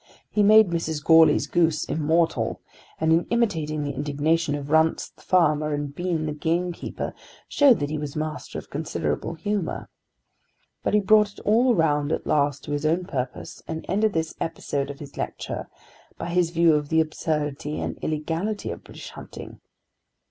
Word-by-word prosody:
He 210 - +2
made 215 -2 +6
Mrs. 160 -3 -2
Goarly's 160 -2 +6
goose 160 -3 +1
immortal, 160 +2 0 0.4
and 160 0 +3
in 165 +1 +3
imitating 160 -11 0
the 145 -1 -3
indignation 145 +3 0
of 145 0 -6
Runce 160 0 +3
the - - -23
farmer 155 -4 +2
and 145 -1 -4
Bean 170 -1 -2
the 155 - -2
gamekeeper 170 +4 -2 0.3
showed 275 -6 +5
that 145 0 -2
he 155 - -2
was 145 -1 -5
master 155 0 -4
of - - -9
considerable 165 - -2
humour. 205 0 -3 0.9
But - - 0
he - - +6
brought 210 0 +4
it - - -14
all 235 +3 +3
round 150 -3 +1
at - - -2
last 145 -1 +1
to - - -7
his 145 0 -1
own 165 +4 +1
purpose, 130 -8 -5
and 160 - -5
ended 210 +3 +1
this 160 -1 -1
episode 140 -3 -2
of 140 - -7
his 145 -1 -11
lecture - - -4 0.5
by - - -5
his 175 -1 +2
view 170 -1 +4
of 150 -1 0
the 160 - +3
absurdity 150 -2 -2
and - - -4
illegality 165 +7 -2
of - - -8
British - - -10
hunting. - - -10
160 Hz, 170 wpm, -24 LUFS, 150-175 Hz, 0.9 s, made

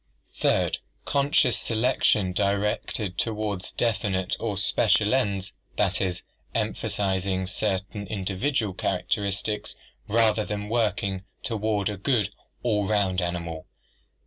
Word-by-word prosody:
Third, - - +2 0.3
conscious 140 0 +3
selection 110 -5 +2
directed 100 0 0
toward 105 -4 -1
definite 100 -5 +1
or - - -2
special 105 +2 +3
ends, 100 -6 0 0.2
that 95 -3 +2
is, 90 -2 -1 0.3
emphasizing 95 -1 0
certain 100 +2 -2
individual 100 +3 -1
characteristics 100 +3 -1 0.3
rather 110 0 +3
than 105 0 -4
working 100 -4 0 0.2
toward 105 -2 0
a 105 -1 -2
good, 105 -1 +1 0.3
all 105 -4 +1
round 95 -3 +2
animal. 85 -2 -3
100 Hz, 100 wpm, -26 LUFS, 95-110 Hz, 0.3 s, conscious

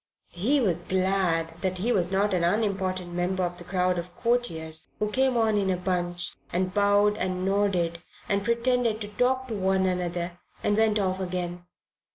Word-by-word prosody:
He 235 +12 +1
was 180 -8 +1
glad 180 -3 0
that 185 -1 -1
he 220 +7 0
was 180 -5 +1
not 200 +1 +2
an 175 -2 +1
unimportant 185 -2 0
member 180 +2 0
of 175 0 -2
the 175 - -5
crowd 180 0 0
of 175 +1 -8
courtiers 165 -10 -1
who 210 0 -1
came 260 +1 +2
on 220 -2 +3
in 195 -1 0
a 185 - +1
bunch 180 -1 -2 0.2
and 185 +1 -1
bowed 205 +1 +3
and 185 0 -1
nodded 190 -4 +1 0.3
and 200 0 +1
pretended 235 0 +1
to 205 - -5
talk 255 +4 +1
to - - -3
one 190 -1 +1
another 175 -1 -2 0.2
and 205 - +2
went 220 0 +3
off 190 -2 0
again. 180 -1 -4
190 Hz, 180 wpm, -27 LUFS, 175-210 Hz, 0.3 s, on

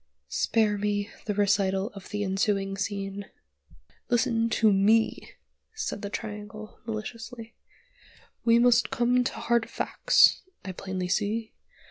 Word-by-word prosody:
Spare 210 - +1
me 205 0 -1 0.2
the 210 - -1
recital 200 0 +1
of 195 -1 -11
the 205 0 -2
ensuing 195 0 0
scene. 200 0 -4 0.8
"Listen 230 -1 +2
to 220 -2 +3
me," 215 +3 +2 0.4
said 435 - -4
the 200 - -4
Triangle, 210 0 -7
maliciously. 230 +1 -6 0.9
"We 230 0 +5
must 240 -1 +4
come 245 +1 +2
to - - -2
hard 235 0 0
facts, - - +3 0.2
I 190 - -4
plainly 185 0 -4
see. 215 +4 -1
210 Hz, 120 wpm, -27 LUFS, 200-230 Hz, 0.9 s, We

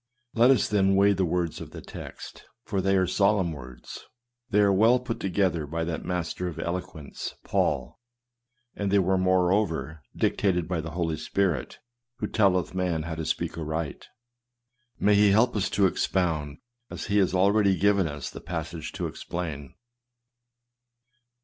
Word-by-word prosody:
Let 120 +2 +5
us, 130 -5 +4
then, 95 -2 +3
weigh 100 +1 +5
the 95 -1 +1
words 85 -1 -1
of - - -8
the - - -9
text, - - -10 0.2
for 95 - -2
they 95 +1 +2
are 95 - +3
solemn 100 -1 +2
words. 65 -4 -10 0.5
They 105 0 +3
are 100 -1 +4
well 115 +6 +5
put 120 -2 -5
together 90 -5 0
by 80 +2 -2
that 80 -1 -3
master 90 0 -3
of 85 - -6
eloquence, 85 -4 -5
Paul, - - -1 0.8
and 100 -1 -2
they 100 - +3
were, 95 0 +2
moreover, 90 -4 +1
dictated 90 -5 +1
by 85 -2 -1
the 80 - -6
Holy 80 -3 -1
Spirit, 90 +2 -1 0.4
who - - -2
telleth 95 -6 +2
man 90 -4 -1
how 80 +1 -4
to 80 0 -4
speak - - -2
aright. 80 -1 -4 0.9
May 105 - +3
he 105 0 +5
help 110 +5 +3
us 100 -2 0
to 100 - +2
ex 95 - +1
pound, 80 -6 -1 0.3
as - - -6
he 105 0 +2
has 95 -1 +2
already 100 0 +3
given 100 -3 +3
us 75 -3 -6
the - - -9
passage 80 -1 -5
to - - -3
explain. 75 -6 -5
90 Hz, 160 wpm, -26 LUFS, 80-100 Hz, 0.9 s, Let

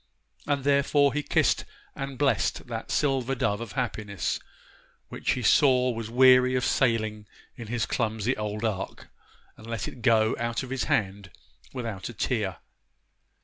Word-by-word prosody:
And 140 -2 0
therefore 140 0 +3
he 150 - 0
kissed - - +2 0.3
and 135 -1 -5
blessed 140 0 +1
that 115 -2 -6
silver 135 -2 0
dove 105 -3 -1
of 115 -4 -7
happiness, 100 -4 -2 0.7
which - - -1
he 125 - -4
saw 125 +2 +4
was 115 -1 -5
weary 125 +1 +5
of 125 - +1
sailing 110 -4 0 0.3
in 120 -3 -8
his 115 +1 -1
clumsy 110 +1 -1
old 105 +1 -3
ark, 100 -4 -4 0.5
and 110 - -13
let 115 -3 -3
it 125 - -9
go 110 -1 +3
out 115 +2 -2
of 130 - -8
his 135 -2 -1
hand 100 -2 -1 0.4
without 115 -7 -5
a - - -8
tear. 105 -5 -1
115 Hz, 150 wpm, -27 LUFS, 110-130 Hz, 0.7 s, weary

